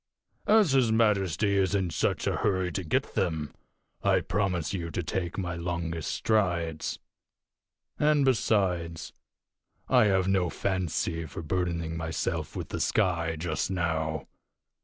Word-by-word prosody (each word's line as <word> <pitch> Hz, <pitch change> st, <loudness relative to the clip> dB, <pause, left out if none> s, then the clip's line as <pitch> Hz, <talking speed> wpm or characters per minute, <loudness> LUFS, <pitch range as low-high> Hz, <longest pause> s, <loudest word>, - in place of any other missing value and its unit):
As 210 Hz, -7 st, +5 dB
his 130 Hz, -4 st, +3 dB
majesty 100 Hz, -3 st, +2 dB
is 95 Hz, +1 st, +1 dB
in 95 Hz, -3 st, 0 dB
such 80 Hz, -, 0 dB
a -, -, 0 dB
hurry 95 Hz, -3 st, 0 dB
to 95 Hz, -, -3 dB
get 80 Hz, -, -1 dB
them, 80 Hz, -6 st, -1 dB, 0.5 s
I -, -, +3 dB
promise 90 Hz, -5 st, -1 dB
you 85 Hz, -3 st, -3 dB
to 90 Hz, -, -3 dB
take 85 Hz, +1 st, -3 dB
my 90 Hz, -3 st, -2 dB
longest 85 Hz, -1 st, -3 dB
strides. 85 Hz, -7 st, 0 dB, 1.0 s
And, 150 Hz, -2 st, +4 dB
besides, 90 Hz, -, +1 dB, 0.7 s
I 125 Hz, -4 st, +5 dB
have 95 Hz, -2 st, +2 dB
no 95 Hz, -3 st, +2 dB
fancy 85 Hz, -3 st, -2 dB
for 80 Hz, -, -7 dB
burdening 85 Hz, -1 st, -1 dB
myself 80 Hz, -1 st, -3 dB
with -, -, -5 dB
the -, -, -4 dB
sky 85 Hz, -6 st, +1 dB
just 90 Hz, +4 st, -2 dB
now." 80 Hz, -4 st, -1 dB
90 Hz, 135 wpm, -28 LUFS, 80-100 Hz, 1.0 s, As